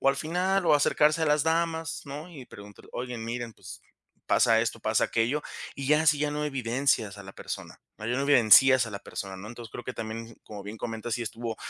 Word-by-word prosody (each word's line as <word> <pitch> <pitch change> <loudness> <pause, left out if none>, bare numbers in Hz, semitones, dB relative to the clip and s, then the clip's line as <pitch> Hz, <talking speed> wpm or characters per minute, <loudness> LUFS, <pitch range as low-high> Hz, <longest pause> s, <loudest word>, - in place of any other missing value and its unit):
o 135 - +3
al 135 - +2
final, 180 +4 0
o - - +6
acercarse 150 +2 +3
a - - +2
las 150 0 +3
damas, 165 0 -1
¿no?, 145 +5 -7
y 145 -7 -10
preguntar: 100 0 -13
"Oigan, 125 -2 -5
miren, 120 0 -4
pues - - -11 0.5
pasa - - +4
esto, - - -2
pasa - - +2
aquello", 120 +7 0 0.3
y 135 -1 -4
ya 150 +2 +4
así 150 -2 +4
ya 150 0 0
no 150 0 -2
evidencias 125 -5 0
a 100 - -9
la 95 +1 -11
persona, - - -7 0.2
no 110 - -9 0.2
evidencias 130 -1 +6
a - - -7
la 100 - -5
persona, 95 -1 -7
¿no?, 100 +3 -9
entonces 115 0 -9
creo 120 - -8
que - - -4
también, 115 +1 -6
como 105 -2 -9
bien 105 +2 -7
comentas, 115 0 -4
sí 120 - -3
estuvo 115 0 -5
125 Hz, 215 wpm, -27 LUFS, 115-150 Hz, 0.5 s, o